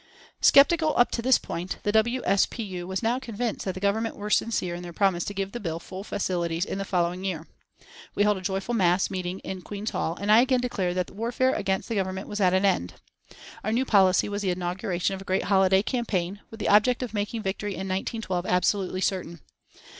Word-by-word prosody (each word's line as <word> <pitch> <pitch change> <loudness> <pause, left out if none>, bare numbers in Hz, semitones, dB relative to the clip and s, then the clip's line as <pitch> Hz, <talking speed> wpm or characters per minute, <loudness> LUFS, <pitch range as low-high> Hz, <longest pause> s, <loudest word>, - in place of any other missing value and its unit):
Sceptical 310 +2 +5
up 245 - +4
to 235 - -2
this 255 +1 +5
point, 175 +2 -5
the 205 - +1
W. 235 +4 +2
S. 195 +1 +3
P. 230 - -6
U. 180 -3 -6
was 190 +3 -3
now 235 +3 +1
convinced 235 -3 -4
that 190 -2 -2
the - - -5
Government 215 +3 0
were 210 +1 -6
sincere 195 -7 +1
in 175 - -6
their 175 -1 -7
promise 185 -2 +2
to 205 - -4
give 195 0 -2
the 240 - -5
bill 165 -6 -3
full 190 +2 -8
facilities 175 -4 -1
in 195 - -4
the 195 - -3
following 180 -1 -1
year. 170 -5 -3 0.7
We 205 - +3
held 210 -1 +3
a - - -7
joyful 195 +4 -2
mass 185 -4 +2
meeting 185 -1 -3
in 190 -1 -6
Queen's 205 +3 -5
Hall 165 +2 -2
and 205 +1 0
I 220 +2 +8
again 255 0 +2
declared 190 -8 -1
that 180 - -1
warfare 235 +5 0
against 195 -2 -1
the 230 - -3
Government 190 -1 -2
was 210 0 -4
at 185 -2 +4
an 190 +2 +2
end. 180 - +1 0.7
Our 215 - -1
new 245 +4 +1
policy 190 -5 +4
was 205 0 -3
the 195 - 0
inauguration 180 +1 -1
of 190 - -6
a - - -7
great 190 -1 0
holiday 190 -1 +3
campaign, 200 -6 -2
with 225 - -11
the - - -1
object 225 +5 +4
of 235 -4 -6
making 210 +1 -2
victory 200 +1 -3
in 190 - -5
1912 190 -1 -2
absolutely 185 +1 +1
certain. 170 -4 -2
195 Hz, 220 wpm, -26 LUFS, 185-220 Hz, 0.7 s, I